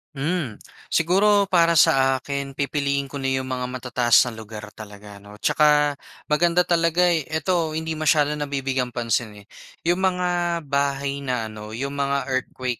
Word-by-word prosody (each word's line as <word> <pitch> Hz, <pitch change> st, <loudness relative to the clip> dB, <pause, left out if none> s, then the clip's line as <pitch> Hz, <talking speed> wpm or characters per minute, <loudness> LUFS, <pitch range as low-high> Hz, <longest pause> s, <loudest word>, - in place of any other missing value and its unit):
Hmm, 140 Hz, -5 st, -2 dB, 0.3 s
siguro 200 Hz, +5 st, +3 dB
para 170 Hz, -2 st, +4 dB
sa 135 Hz, -3 st, +4 dB
akin 140 Hz, +1 st, -5 dB
pipiliin 140 Hz, 0 st, -1 dB
ko 140 Hz, -, -5 dB
na 135 Hz, -, -2 dB
yung 130 Hz, 0 st, -3 dB
mga 125 Hz, -1 st, -2 dB
matataas 125 Hz, -2 st, +2 dB
na 125 Hz, -, -4 dB
lugar 110 Hz, -1 st, -9 dB
talaga 105 Hz, -1 st, -12 dB
ano. 105 Hz, +1 st, -14 dB
Tsaka, 150 Hz, +4 st, +3 dB, 0.4 s
maganda 170 Hz, +3 st, +3 dB
talaga, 170 Hz, 0 st, +2 dB
eh, 160 Hz, -4 st, -1 dB
ito 160 Hz, 0 st, -1 dB
hindi 160 Hz, 0 st, -3 dB
masyado 150 Hz, -1 st, +3 dB
nabibigyang 135 Hz, -4 st, -2 dB
pansin 110 Hz, -3 st, -2 dB
eh. -, -, -30 dB, 0.4 s
Yung 175 Hz, +2 st, +1 dB
mga 175 Hz, -2 st, 0 dB
bahay 140 Hz, 0 st, 0 dB
na 125 Hz, -5 st, -3 dB
ano, 105 Hz, 0 st, -9 dB
yung 140 Hz, +3 st, -4 dB
mga 140 Hz, -1 st, -1 dB
earthquake 130 Hz, -1 st, -3 dB
140 Hz, 155 wpm, -23 LUFS, 125-160 Hz, 0.4 s, para